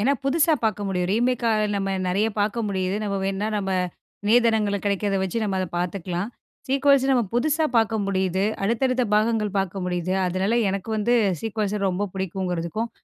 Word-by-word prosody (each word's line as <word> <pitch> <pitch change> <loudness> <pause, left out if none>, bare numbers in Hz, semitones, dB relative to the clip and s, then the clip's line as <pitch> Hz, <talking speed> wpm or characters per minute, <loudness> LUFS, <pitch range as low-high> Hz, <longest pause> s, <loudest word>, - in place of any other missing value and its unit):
ஏன்னா 265 +7 +3
புதுசா 315 +3 +3
பார்க்க 210 -2 0
முடியும். 180 -2 -1
ரீமேக்கால 230 -2 +1
நம்ம 195 -1 -1
நெறைய 200 +5 +1
பார்க்க 215 +2 0
முடியுது. 190 0 -1
நம்ம 200 -1 -1
வேணா 195 +2 -1
நம்ப 195 -2 -1 0.6
நேதனங்கள்ல 220 -3 +3
கிடைக்கிறத 200 0 0
வச்சு 190 +4 -1
நம்ப 195 -2 -1
அதை 185 - -2
பார்த்துக்கலாம். 180 +1 -3 0.4
சீக்குவல்ஸ் 275 0 +3
நம்ம 245 -3 +3
புதுசா 310 +6 +2
பார்க்க 225 0 +1
முடியுது. 190 -1 0 0.2
அடுத்தடுத்த 250 +4 +1
பாகங்கள் 215 -1 +1
பார்க்க 195 -1 -2
முடியுது. 180 +1 -1
அதனால 185 +5 0 0.2
எனக்கு 195 +3 -4
வந்து 235 +4 +2 0.3
சீக்குவல்ஸ 210 -2 -2
ரொம்ப 195 +2 -1
புடிக்குங்கிறதுக்கும் 190 +2 -3
205 Hz, 150 wpm, -24 LUFS, 190-230 Hz, 0.6 s, ஏன்னா